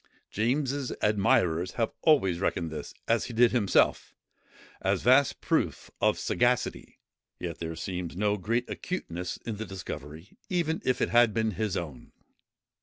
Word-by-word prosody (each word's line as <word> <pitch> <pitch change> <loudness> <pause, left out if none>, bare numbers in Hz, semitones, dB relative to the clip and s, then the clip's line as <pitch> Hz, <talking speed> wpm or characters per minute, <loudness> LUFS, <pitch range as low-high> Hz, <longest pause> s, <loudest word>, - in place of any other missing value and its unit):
James's 135 +4 0
admirers 90 -4 +2
have 115 -2 0
always 95 - +3
reckoned 85 -3 -1
this, 75 -2 -6 0.2
as 115 0 +2
he 120 - -7
did 120 +1 +5
himself, 110 -6 +2 0.7
a - - +2
vast 130 +1 +3
proof - - -1
of - - +3
sagacity: - - 0 0.4
yet 85 -2 -5
there 80 -1 -4
seems 90 0 -5
no 105 +1 +2
great 115 +6 -1
acuteness 90 - -4
in 110 -3 -4
the 110 - -4
discovery, 80 - -8
even 165 -3 0
if 130 - 0
it - - +2
had 120 -2 +4
been 110 -1 +1
his 105 -1 -2
own. 75 -8 -7
105 Hz, 145 wpm, -28 LUFS, 85-120 Hz, 0.7 s, did